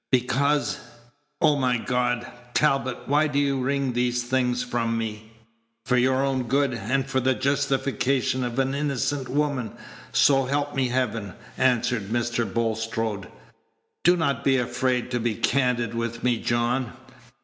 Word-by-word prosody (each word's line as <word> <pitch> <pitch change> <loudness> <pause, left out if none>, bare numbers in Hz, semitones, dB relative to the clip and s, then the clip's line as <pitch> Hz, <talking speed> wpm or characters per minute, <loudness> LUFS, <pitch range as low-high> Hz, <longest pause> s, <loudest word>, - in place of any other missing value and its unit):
"Because 140 +3 +1 0.6
O 150 -3 +4
my 125 -3 +2
God! 125 0 0 0.3
Talbot, 135 -4 +1
why 150 +2 +3
do 145 -1 -2
you 140 -2 +1
wring 135 0 0
these 120 0 0
things 125 0 0
from 115 -2 -1
me?" 110 -1 -5 0.5
"For 125 - +2
your 130 +2 +3
own 130 -3 -1
good, 135 +1 +2
and 125 +4 -1
for 135 -1 0
the 130 +1 +2
justification 135 -1 0
of 120 0 -3
an 135 0 +1
innocent 140 -2 -1
woman, 140 -4 -1 0.4
so 135 -2 +4
help 145 +2 -1
me 135 -2 +1
Heaven!" 115 -6 -2 0.2
answered 125 -4 +1
Mr. 120 -1 -1
Bulstrode. 110 -2 -2 0.8
"Do 175 +1 +5
not 140 -7 0
be 135 -1 +3
afraid 125 0 -1
to 120 - 0
be 115 -1 -1
candid 125 -3 +1
with 115 0 -3
me, 125 -2 +2
John. 120 +1 0
125 Hz, 145 wpm, -25 LUFS, 120-135 Hz, 0.8 s, Do